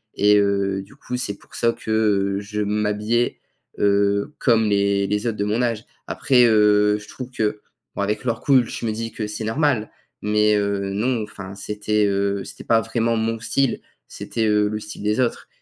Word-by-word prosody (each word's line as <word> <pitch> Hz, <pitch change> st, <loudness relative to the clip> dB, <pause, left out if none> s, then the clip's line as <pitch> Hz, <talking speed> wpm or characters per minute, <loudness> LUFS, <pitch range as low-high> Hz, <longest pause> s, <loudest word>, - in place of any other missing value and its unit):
et 105 Hz, 0 st, +5 dB
heu, 100 Hz, -1 st, +1 dB
du 100 Hz, -, -15 dB
coup, 125 Hz, -, -5 dB
c'est 100 Hz, -5 st, -3 dB
pour -, -, -23 dB
ça 115 Hz, -, +2 dB
que 105 Hz, -4 st, 0 dB
je 105 Hz, +1 st, -5 dB
m'habillais, 105 Hz, +3 st, 0 dB, 0.4 s
heu, 100 Hz, +4 st, +2 dB
comme 115 Hz, -4 st, +3 dB
les 100 Hz, -1 st, +2 dB
les 105 Hz, +3 st, -1 dB
autres 110 Hz, -2 st, -2 dB
de 100 Hz, -, 0 dB
mon 110 Hz, +4 st, 0 dB
âge. 115 Hz, -2 st, -1 dB, 0.2 s
Après, 125 Hz, -3 st, +3 dB
heu, 105 Hz, -2 st, +4 dB
je 105 Hz, -, -13 dB
trouve 125 Hz, -1 st, -8 dB
que 105 Hz, -4 st, -2 dB, 0.3 s
bon -, -, -2 dB
avec 105 Hz, +3 st, -1 dB
le 120 Hz, -, +1 dB
recul, 130 Hz, 0 st, +2 dB
je 115 Hz, -, -4 dB
me -, -, 0 dB
dis 115 Hz, +1 st, -4 dB
que 110 Hz, -1 st, -4 dB
c'est 105 Hz, +1 st, -5 dB
normal. 115 Hz, -1 st, 0 dB, 0.3 s
Mais 105 Hz, 0 st, +3 dB
heu, 100 Hz, -1 st, -1 dB
non, 120 Hz, +3 st, 0 dB
enfin, 100 Hz, -2 st, -9 dB
c'était, 105 Hz, +1 st, -1 dB
heu, 100 Hz, 0 st, 0 dB
c'était -, -, -10 dB
pas 115 Hz, -1 st, +3 dB
vraiment 115 Hz, 0 st, 0 dB
mon 115 Hz, +1 st, -1 dB
style, 130 Hz, +3 st, 0 dB, 0.3 s
c'était, 115 Hz, -1 st, -3 dB
heu, 105 Hz, -1 st, +3 dB
le 105 Hz, +1 st, -3 dB
style 105 Hz, 0 st, -9 dB
des 105 Hz, +3 st, 0 dB
autres. 125 Hz, -2 st, -1 dB
105 Hz, 190 wpm, -22 LUFS, 100-115 Hz, 0.4 s, et